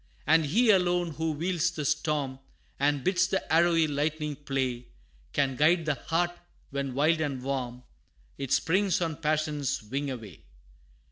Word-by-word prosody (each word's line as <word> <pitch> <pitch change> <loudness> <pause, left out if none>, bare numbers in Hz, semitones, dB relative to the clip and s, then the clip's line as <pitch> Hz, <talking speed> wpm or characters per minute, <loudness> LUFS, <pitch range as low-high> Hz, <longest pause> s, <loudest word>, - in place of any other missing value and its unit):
And 160 -1 +4
He 220 +9 +4
alone, 175 -3 +2
who 160 +1 -2
wields 170 +2 0
the 150 -3 -5
storm, 140 -2 -1 0.4
And 145 -1 +1
bids 185 -1 +2
the 190 -3 -2
arrowy 165 0 +4
lightning 150 0 -1
play, 130 -4 -3 0.4
Can 135 -2 +1
guide 160 +5 +3
the 150 - +2
heart, 170 +4 -1 0.4
when 140 -2 -3
wild 155 +3 +3
and 140 -5 -2
warm, 125 -2 -3 0.5
It 135 -2 -5
springs 180 +7 +2
on 165 -4 -2
passion's 150 -5 -1
wing 140 +6 -3
away! 115 -9 -8
150 Hz, 145 wpm, -28 LUFS, 135-165 Hz, 0.5 s, And